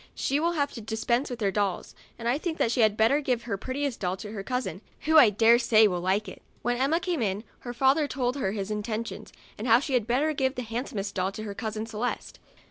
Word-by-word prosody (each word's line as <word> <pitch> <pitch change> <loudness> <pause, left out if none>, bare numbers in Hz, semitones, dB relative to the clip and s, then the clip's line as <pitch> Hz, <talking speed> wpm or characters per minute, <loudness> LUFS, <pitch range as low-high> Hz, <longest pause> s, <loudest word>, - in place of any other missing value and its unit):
She 280 +2 0
will 340 +2 +1
have 285 -3 0
to 230 - -7
dispense 225 +4 -1
with 245 -2 -6
her 200 -2 +2
dolls, 200 -2 -2 0.2
and 230 - -5
I 250 +5 +1
think 330 -1 -3
she 240 - +1
had 215 -1 +3
better 250 +7 +3
give 250 -4 -1
her 230 -4 -2
prettiest 260 +5 -3
doll 185 0 -2
to 210 +1 -8
her 210 -3 -5
cousin, 250 -3 -3 0.2
who, 315 0 +6
I 245 -7 +8
dare 225 +3 +5
say, 220 -3 +5
will 180 -3 -2
like 190 +4 0
it." - - -10 0.2
When 245 +1 +1
Emma 275 +6 +2
came 355 -6 -2
in, 205 -1 -1 0.2
her 245 - -6
father 275 +4 +3
told 255 -2 -1
her 195 -8 -1
his 205 -1 -4
intentions, 215 +2 -4 0.3
and 225 - -3
how 230 +1 +6
she 275 0 -4
had 240 -4 +1
better 280 +6 +1
give 265 -1 0
the 250 - -3
handsom 230 +1 -5
est 200 +1 -3
doll 190 0 -1
to 215 - -6
her 205 -2 -5
cousin 220 0 -4
Celeste. 225 +2 -4
235 Hz, 245 wpm, -27 LUFS, 210-265 Hz, 0.3 s, I